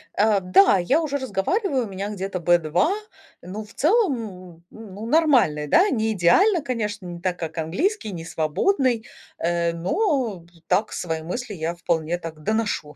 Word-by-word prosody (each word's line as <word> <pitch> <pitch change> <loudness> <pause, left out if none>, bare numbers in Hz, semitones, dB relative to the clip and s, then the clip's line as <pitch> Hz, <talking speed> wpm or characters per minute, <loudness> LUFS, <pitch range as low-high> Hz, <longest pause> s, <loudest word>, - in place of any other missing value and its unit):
А, 210 -1 +3
да, 190 +1 +5
я 265 - +2
уже 285 -3 -2
разговариваю, 260 - -1
у - - -7
меня 195 +2 -4
где-то 195 -2 -4
B2, 175 - +2 0.5
но 200 +5 -7
в 210 - -16
целом, 370 - +3 0.4
м, 165 0 -18
ну, 215 -1 -9
нормальный, 245 - +3
да, 380 - +4
не 220 -5 0
идеально, 330 - +4
конечно, 210 -7 -3
не 175 -1 -7
так, 180 0 -2
как 165 0 -5
английский, 215 - -1
не 165 -2 -7
свободный, 230 - 0 0.3
э, 170 0 0
но 240 - -1 0.2
так 215 +1 +1
свои 160 -2 -3
мысли 215 +7 -5
я 165 0 -3
вполне 170 -1 -1
так 165 -2 -9
доношу. 210 -9 -1
200 Hz, 160 wpm, -23 LUFS, 170-260 Hz, 0.5 s, да